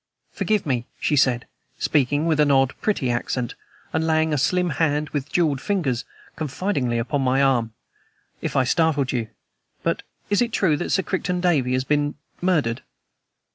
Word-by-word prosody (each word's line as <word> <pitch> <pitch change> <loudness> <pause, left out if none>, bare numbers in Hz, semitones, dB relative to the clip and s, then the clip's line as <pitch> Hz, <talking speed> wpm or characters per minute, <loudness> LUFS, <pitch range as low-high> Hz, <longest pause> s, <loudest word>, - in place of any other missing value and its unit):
"Forgive 215 -2 0
me," 125 -4 -1
she 150 - +1
said, 125 -4 +3 0.3
speaking 145 +2 +1
with 160 -2 +1
an 150 -1 +4
odd, 135 -1 +4
pretty 140 - 0
accent, 120 0 -2 0.4
and 160 - +1
laying 160 0 +2
a - - +2
slim 180 +5 +1
hand, 150 -1 +1
with 145 -1 -4
jeweled 150 -6 +1
fingers, 150 - -1 0.3
confidingly 150 -5 -1
upon 130 +5 -1
my 130 0 +2
arm, 125 -5 +2 0.7
"if - - -3
I 135 - +4
startled 145 -1 +2
you. 120 -3 -1 0.6
But - - 0 0.3
is 205 - +3
it 240 -1 +1
true 170 -6 +3
that 175 - -3
Sir 190 - +2
Crichton 180 -1 -1
Davey 150 -8 +2
has 130 0 +1
been 145 +1 0 0.3
murdered?" 155 -11 +1
145 Hz, 165 wpm, -23 LUFS, 130-165 Hz, 0.7 s, an